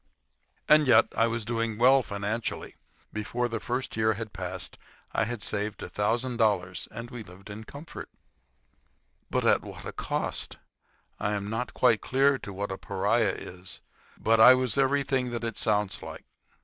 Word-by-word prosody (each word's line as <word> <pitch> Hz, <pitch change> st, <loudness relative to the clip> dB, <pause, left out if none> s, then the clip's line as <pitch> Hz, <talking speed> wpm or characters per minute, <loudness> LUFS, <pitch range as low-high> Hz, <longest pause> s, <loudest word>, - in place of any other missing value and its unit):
And 150 Hz, -1 st, +6 dB
yet 125 Hz, -, +6 dB
I 115 Hz, -, +4 dB
was 115 Hz, -1 st, -3 dB
doing 115 Hz, -1 st, -1 dB
well 130 Hz, +3 st, +6 dB
financially. 105 Hz, +1 st, -3 dB, 0.4 s
Before 115 Hz, +3 st, -1 dB
the 115 Hz, -1 st, -3 dB
first 125 Hz, +2 st, -3 dB
year 110 Hz, 0 st, +2 dB
had 110 Hz, 0 st, -6 dB
passed 90 Hz, -1 st, -5 dB, 0.3 s
I -, -, +2 dB
had 115 Hz, -1 st, -4 dB
saved 105 Hz, 0 st, -3 dB
a -, -, -6 dB
thousand 120 Hz, +4 st, 0 dB
dollars, 95 Hz, -6 st, +1 dB
and 120 Hz, +1 st, -8 dB
we 120 Hz, -, -7 dB
had 110 Hz, -, -10 dB
lived 95 Hz, +3 st, -12 dB
in 110 Hz, +2 st, -8 dB
comfort. 145 Hz, +7 st, -9 dB, 1.2 s
But -, -, 0 dB
at -, -, +4 dB
what -, -, -10 dB
a -, -, -4 dB
cost! -, -, -3 dB, 0.6 s
I 105 Hz, -, 0 dB
am 100 Hz, 0 st, -3 dB
not 115 Hz, +3 st, -3 dB
quite 120 Hz, -4 st, +4 dB
clear 135 Hz, +2 st, +3 dB
as 135 Hz, -, -4 dB
to 100 Hz, -, -6 dB
what 100 Hz, +1 st, -3 dB
a 95 Hz, -, -5 dB
pariah 105 Hz, +3 st, +1 dB
is, 90 Hz, +1 st, -9 dB, 0.4 s
but 115 Hz, 0 st, +3 dB
I 125 Hz, +3 st, +10 dB
was 130 Hz, -4 st, 0 dB
everything 135 Hz, -2 st, +2 dB
that 120 Hz, 0 st, -4 dB
it 115 Hz, -2 st, -3 dB
sounds 105 Hz, -2 st, 0 dB
like. -, -, -9 dB
115 Hz, 175 wpm, -28 LUFS, 105-125 Hz, 1.2 s, I